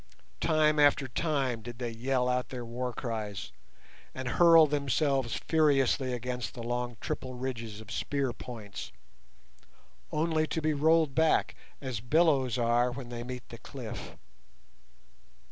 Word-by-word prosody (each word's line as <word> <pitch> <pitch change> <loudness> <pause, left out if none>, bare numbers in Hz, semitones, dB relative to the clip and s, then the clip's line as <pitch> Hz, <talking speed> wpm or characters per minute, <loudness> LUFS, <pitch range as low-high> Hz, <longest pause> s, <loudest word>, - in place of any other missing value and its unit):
Time 155 -1 +3
after 145 -2 +4
time 135 -4 -1
did 120 +1 -8
they 120 -1 -3
yell 125 +2 0
out 125 0 0
their 125 -2 -5
war 125 +2 -3
cries, 110 -5 -4 0.6
and 130 -1 -4
hurl 165 +1 +7
themselves 140 -3 0
furiously 140 -4 +2
against 125 -2 -4
the 120 - -6
long 120 0 -2
triple 130 -1 -4
ridges 115 -4 -5
of 110 -2 -11
spear 140 -3 -1
points, 110 -4 -8 1.2
only 155 0 +1
to 160 - -2
be 155 0 +1
rolled 155 0 +3
back 160 +1 +3 0.3
as 130 -5 -3
billows 135 -1 +3
are 120 +1 +3
when 120 -1 -7
they 120 -1 -5
meet 125 0 -7
the - - -9
cliff. - - -8
130 Hz, 135 wpm, -30 LUFS, 120-145 Hz, 1.2 s, hurl